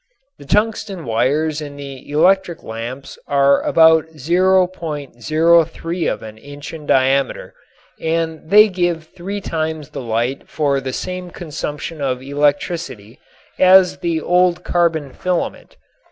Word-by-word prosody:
The 145 - -12
tungsten 205 -1 -1
wires 145 +7 0
in 145 -1 -7
the 140 -2 -10
electric 175 +3 +2
lamps 120 +4 -7
are 140 -1 +3
about 160 -1 +4
.03 165 -1 +1
of - - -5
an 110 0 -10
inch 145 +4 -10
in 155 -2 -9
diameter, 135 +1 +1 0.5
and 160 -1 -2
they 210 +3 +7
give 175 -4 -1
three 190 +4 -6
times 160 -4 -3
the - - -6
light 120 +3 -2
for 140 -3 0
the 130 -1 -4
same 180 +3 -5
consumption 155 -2 -6
of 130 -2 -1
electricity 145 - -2 0.4
as 185 0 +6
the 170 -2 -1
old 180 +1 +2
carbon 160 -5 0
filament. 180 -2 -3
160 Hz, 125 wpm, -19 LUFS, 140-175 Hz, 0.5 s, they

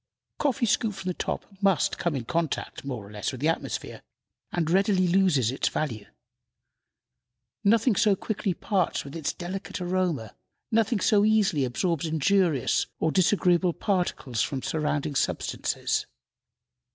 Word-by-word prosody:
Coffee 280 -3 +1
scooped 215 -1 +1
from 190 -1 -4
the - - 0
top - - -3 0.2
must 195 -5 +2
come 170 -4 0
in 125 -4 -3
contact, 165 +1 -2
more 125 -7 -5
or 100 - -13
less, 105 -1 -3
with 130 - -7
the 150 +4 +2
atmosphere, 165 - -3 0.5
and 170 -3 -1
readily 190 +1 +3
loses 170 - +3
its 135 - 0
value. 115 -9 -3 1.6
Nothing 225 +2 +4
so 205 -1 +4
quickly 195 -2 -2
parts 185 -6 0
with 140 - -9
its 160 -3 -1
delicate 185 +3 -6
aroma; 175 - -1 0.4
nothing 225 -1 +2
so 205 -3 +4
easily 210 -9 +3
absorbs 165 +6 -1
injurious 160 - +2
or 160 - +1
disagreeable 180 -1 +3
particles 175 - -1
from 135 +3 -2
surrounding 150 -2 -1
substances. 135 - -1
175 Hz, 140 wpm, -27 LUFS, 145-195 Hz, 1.6 s, Nothing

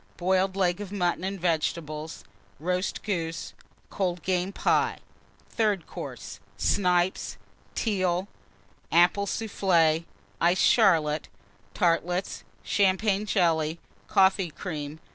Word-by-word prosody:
Boiled 190 +1 +1
Leg 180 0 +1
of 200 -2 -7
Mutton 180 -3 0
and 195 +1 -3
Vegetables. 160 -2 -2 0.4
Roast 180 +4 -2
Goose. 165 -5 -3 0.4
Cold 180 -4 -2
Game 185 0 0
Pie. - - +1 0.5
THIRD 210 -7 0
COURSE. 125 -8 -8 0.2
Snipes. 180 - +1 0.4
Teal. 185 -4 0 0.6
Apple 175 +4 +4
Soufflé. 170 -7 +1 0.4
Iced 175 +2 +3
Charlotte. 160 -9 +3 0.5
Tartlets. 175 +2 0 0.2
Champagne 200 +1 +1
Jelly. 160 -3 +1 0.3
Coffee 190 -1 +3
Cream. 155 -3 -6
180 Hz, 95 wpm, -27 LUFS, 165-195 Hz, 0.6 s, Apple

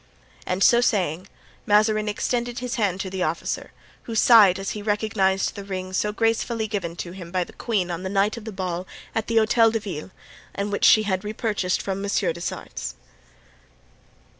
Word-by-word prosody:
And 185 +1 0
so 240 0 +6
saying, 185 -6 0 0.4
Mazarin 215 0 +3
extended 240 +3 -2
his 250 -1 -3
hand 200 -5 0
to 190 - -4
the 190 -1 -4
officer, 165 -1 -2 0.3
who 230 - -5
sighed 215 -5 +7
as 195 0 -4
he 210 - -5
recognized 205 -2 +1
the 200 - -7
ring 185 -1 -5
so 210 +3 0
gracefully 225 +1 0
given 195 -6 -3
to 175 0 -6
him 180 -2 -9
by 185 -1 +1
the - - -14
queen 195 -7 -1
on 170 +1 -4
the 190 - -4
night 200 +2 +1
of 230 -2 -9
the 220 - -5
ball 185 -2 -4 0.3
at 225 -1 -2
the 230 - +1
Hotel 225 +1 +5
de 225 0 -1
Ville 190 -6 -6 0.5
and 200 +1 -2
which 200 - +1
she 215 - +7
had 190 -3 -1
repurchased 210 -3 -1
from 195 0 -3
Monsieur 200 -4 0
des 170 - -9
Essarts. - - -5
200 Hz, 190 wpm, -24 LUFS, 185-220 Hz, 0.5 s, sighed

